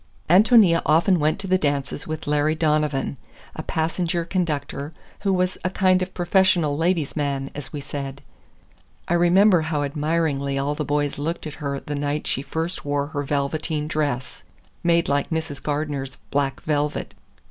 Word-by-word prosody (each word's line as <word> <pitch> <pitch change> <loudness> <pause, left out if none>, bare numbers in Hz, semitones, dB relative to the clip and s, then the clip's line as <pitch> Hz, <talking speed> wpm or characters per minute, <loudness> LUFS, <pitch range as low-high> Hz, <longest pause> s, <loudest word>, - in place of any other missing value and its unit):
Ántonia 195 -1 +6
often 170 +4 +4
went 155 +1 +2
to 195 - -7
the 185 0 +2
dances 145 -1 -2
with 155 0 -4
Larry 150 +1 +2
Donovan, 150 -3 0 0.4
a - - -4
passenger 170 +1 -1
conductor 150 -4 -2 0.3
who 200 - 0
was 185 0 0
a 185 - +1
kind 185 -1 +3
of 185 0 -4
professional 175 -4 +3
ladies' 165 -1 0
man, 140 -2 -2
as 140 -2 -7
we 145 - -5
said. 140 -1 -6 0.8
I - - +1
remember 175 +2 +5
how 155 -2 -1
admiringly 145 -1 0
all 140 +2 0
the 150 - -3
boys 145 0 -1
looked 165 +4 -3
at 155 - -5
her 140 -1 -2
the 145 - -6
night 145 +1 -2
she 135 - -1
first 165 +5 -3
wore 145 0 0
her 145 -2 -2
velveteen 150 +2 -1
dress, 145 -5 -2 0.4
made 170 0 +3
like 140 0 0
Mrs. 160 -4 -3
Gardener's 145 -2 -3 0.2
black 140 -1 0
velvet. 150 -1 -1
150 Hz, 160 wpm, -23 LUFS, 145-170 Hz, 0.8 s, Ántonia